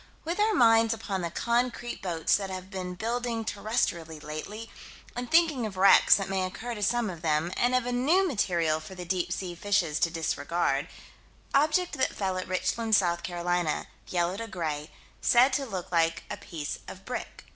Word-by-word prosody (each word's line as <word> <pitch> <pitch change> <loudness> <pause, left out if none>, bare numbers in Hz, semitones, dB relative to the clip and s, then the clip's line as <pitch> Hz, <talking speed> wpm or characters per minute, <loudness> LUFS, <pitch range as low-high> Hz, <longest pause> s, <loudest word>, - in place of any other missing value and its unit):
With 340 +5 -2
our 425 0 +3
minds 225 -4 +5
upon 200 -4 -3
the 170 - -2
concrete 240 +5 -1
boats 170 -4 +1
that 195 -1 -2
have 185 0 -7
been 180 -2 -5
building 230 +2 -2
terrestrially 190 -7 -1
lately, 200 +10 -6 0.4
and 245 0 -4
thinking 320 -6 +4
of 195 -3 -9
wrecks 195 +1 +7
that 195 - -2
may 190 -1 0
occur 225 +6 -4
to 210 - -7
some 235 +3 +1
of 170 -4 -6
them, 160 +2 0
and 245 +1 +2
of 255 -1 +1
a 245 - -1
new 310 +11 +3
material 170 - +1
for 160 +4 -10
the 180 -1 -7
deep 175 0 -1
sea 180 -2 -3
fishes 175 -4 0
to 170 - +3
disregard 160 -2 -1 0.7
Object 305 +5 +3
that 260 - +1
fell 190 -2 -1
at 185 - -5
Richland, 185 +5 +1
South 175 -3 +2
Carolina 175 -2 -1 0.2
yellow 175 +1 0
to 230 +1 -5
gray 155 -6 -3 0.3
said 250 +3 +5
to 275 -1 0
look 185 -6 -5
like 165 -1 +2
a - - -3
piece 165 -7 -6
of 190 0 -10
brick. 250 - -6
195 Hz, 185 wpm, -28 LUFS, 170-235 Hz, 0.7 s, wrecks